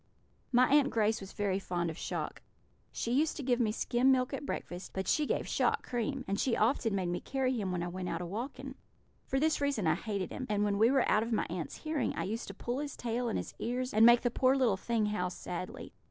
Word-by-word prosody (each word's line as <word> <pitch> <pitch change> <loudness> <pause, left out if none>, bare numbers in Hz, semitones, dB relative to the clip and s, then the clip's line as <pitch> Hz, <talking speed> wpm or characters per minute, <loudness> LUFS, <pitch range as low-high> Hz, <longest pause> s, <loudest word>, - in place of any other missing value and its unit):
"My 250 0 +5
Aunt 290 -2 +5
Grace 220 -3 +1
was 195 - -8
very 200 -2 -1
fond 175 -3 -2
of - - -9
Shock. - - -4 0.5
She 230 - -3
used 300 +5 +2
to 285 - -4
give 250 -1 +1
me 225 -3 +2
skim 245 +4 +2
milk 255 0 +2
at 275 +1 -4
breakfast, 175 +2 -5
but 190 -1 -2
she 300 -1 +2
gave - - -1
Shock - - +1
cream; 255 +2 -2
and 200 +2 -1
she 255 - +1
often 225 -1 +2
made 185 -3 -1
me 175 - -1
carry 265 -1 -1
him 205 -6 -2
when 175 -1 -1
I - - -2
went 180 +1 -4
out 165 - -2
a 180 - -4
walking. 260 +8 -5 0.5
For 270 - +1
this 315 0 +1
reason 280 -9 0
I 160 - +4
hated 195 +1 -3
him, 255 - -5
and 205 -1 +1
when 205 -1 +1
we 225 +2 +6
were 270 -1 +3
out 210 - +4
of 230 +1 -3
my 220 - +1
aunts' 170 -5 -4
hearing 310 -2 -1
I - - -2
used 225 +4 -3
to 200 - -8
pull 240 +5 -3
his 290 -1 -5
tail 240 0 -1
and - - -1
his - - -5
ears 250 +2 -2
and 215 +1 +5
make 235 +1 +8
the 245 - 0
poor 260 +2 +3
little 250 -7 +3
thing 225 +2 0
howl 210 -4 -1
sadly. 185 +8 -6
230 Hz, 250 wpm, -32 LUFS, 195-260 Hz, 0.5 s, make